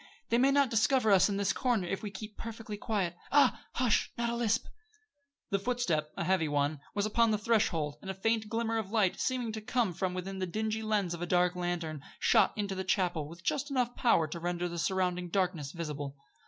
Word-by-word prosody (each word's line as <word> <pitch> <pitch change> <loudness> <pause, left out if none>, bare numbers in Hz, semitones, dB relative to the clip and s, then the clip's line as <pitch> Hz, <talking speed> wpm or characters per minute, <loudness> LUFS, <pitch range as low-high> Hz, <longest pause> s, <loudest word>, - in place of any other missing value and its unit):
They 235 - +3
may 265 +2 +5
not 275 -2 +3
discover 225 0 +3
us 195 +1 +6
in 200 - -1
this 200 -1 +1
corner 240 -8 +1
if 195 - -2
we 210 - -4
keep 210 +2 -8
perfectly 225 -2 -6
quiet. 200 -5 -1 0.2
Ah! 290 0 +4
Hush! 245 -3 +2
Not 235 0 0
a - - -2
lisp!" 230 -1 +1 0.9
The 200 - +2
footstep 190 -10 -1
a - - -1
heavy 180 -2 +2
one 145 0 0 0.2
was 205 0 +1
upon 230 +2 +3
the 215 - +2
threshold, 175 -9 +1
and 190 - -8
a 190 - -3
faint 220 +2 0
glimmer 225 0 0
of 205 -3 -5
light, 210 -4 +2
seeming 250 -3 -1
to 220 0 -5
come 220 -3 0
from 180 +2 -2
the 190 +1 -3
dingy 220 +4 -2
lens 210 -5 0
of 170 - -6
a 175 - -2
dark 180 0 +2
lantern, 175 -4 -3 0.2
shot - - +4
into 200 -2 -1
the 190 0 -3
chapel 180 -5 0
with 170 +1 -12
just 285 - -1 0.2
power 235 -9 +3
enough 155 - -5
to 170 - -4
render 175 +1 -2
the 170 0 -5
surrounding 180 0 0
darkness 175 -6 -1
visible. 150 -4 -5
195 Hz, 210 wpm, -31 LUFS, 175-225 Hz, 0.9 s, us